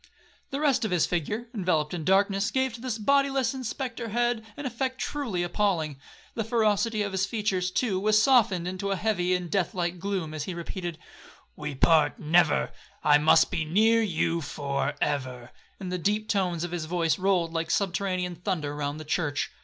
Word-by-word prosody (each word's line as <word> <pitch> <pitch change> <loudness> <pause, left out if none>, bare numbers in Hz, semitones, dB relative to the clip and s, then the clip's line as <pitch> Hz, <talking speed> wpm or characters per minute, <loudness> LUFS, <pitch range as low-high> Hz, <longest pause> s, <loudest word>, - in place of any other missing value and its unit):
The 275 - -3
rest 290 -6 +2
of 220 - 0
his 180 -3 +2
figure, 205 +8 -2
enveloped 175 -8 0
in 170 -3 -3
darkness, 195 +2 +2
gave 260 -2 0
to 230 - -9
this 250 -3 -3
bodyless 275 +1 +2
and 260 -1 -6
spectre 240 -1 -4
head 240 0 0
an 290 - -6
effect 260 +1 -2
truly 235 -12 -2
appalling. 175 -6 0 0.3
The 225 - -2
ferocity 220 -1 +1
of 200 - -3
his 190 0 0
features, 200 -4 -1
too, 195 -1 0
was 215 +2 +3
softened 215 -8 +3
into 185 +2 -3
a 195 - +1
heavy 185 -3 +1
and 180 -1 -3
death 195 -4 0
like 175 0 -2
gloom, 185 -4 -3
as 150 -2 -4
he 185 - -5
repeated, 170 0 -5 0.6
'We 150 -2 -5
part 150 0 +4
never,—I 155 -2 +2
must 155 +1 +5
be 175 -4 -1
near 220 +8 +3
you 170 -4 0
for 140 -1 -2
ever,' 130 -3 -2 0.3
and 185 -2 -5
the 180 - -2
deep 210 +4 0
tones 180 -5 0
of 175 - -4
his 175 -3 -3
voice 165 0 0
rolled 180 -3 +1
like 165 -1 -2
subterranean 185 -2 -1
thunder 165 -6 -2
round 145 +1 -3
the 155 - -8
church. 150 -2 -1
185 Hz, 185 wpm, -27 LUFS, 165-220 Hz, 0.6 s, must